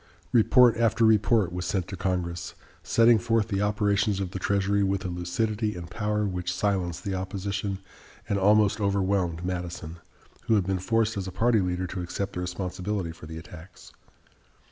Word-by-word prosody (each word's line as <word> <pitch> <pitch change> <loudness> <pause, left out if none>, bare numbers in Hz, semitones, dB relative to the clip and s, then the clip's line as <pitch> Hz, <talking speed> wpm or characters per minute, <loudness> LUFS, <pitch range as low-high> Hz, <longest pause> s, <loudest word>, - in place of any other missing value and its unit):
Report 120 +1 +5
after 115 0 +3
report 105 -3 +3
was 90 0 -3
sent 90 0 -1
to 95 - -5
Congress, 85 -2 -3 0.3
setting 115 -1 +4
forth 115 -2 +1
the 100 -1 0
operations 105 -1 +1
of 95 -2 -3
the 95 - -5
Treasury 100 +1 +1
with 95 -1 0
a - - -2
lucidity 105 +5 -2
and 85 0 -8
power 105 +3 -1
which 90 -2 -2
silenced 90 -2 -1
the 100 - -3
opposition 95 +1 -3 0.5
and 100 - 0
almost 105 +2 +4
overwhelmed 95 -4 0
Madison, 85 -2 -5 0.5
who 115 - +3
had 100 -4 +2
been 95 -1 -1
forced 115 +3 +1
as 95 -1 -3
a - - -5
party 115 +4 +2
leader 90 0 -1
to 90 +1 -5
accept 95 +3 -4
the - - -4
responsibility 90 0 -3
for 80 -1 -12
the 80 0 -7
attacks. 85 +1 -12
95 Hz, 170 wpm, -27 LUFS, 90-105 Hz, 0.5 s, Report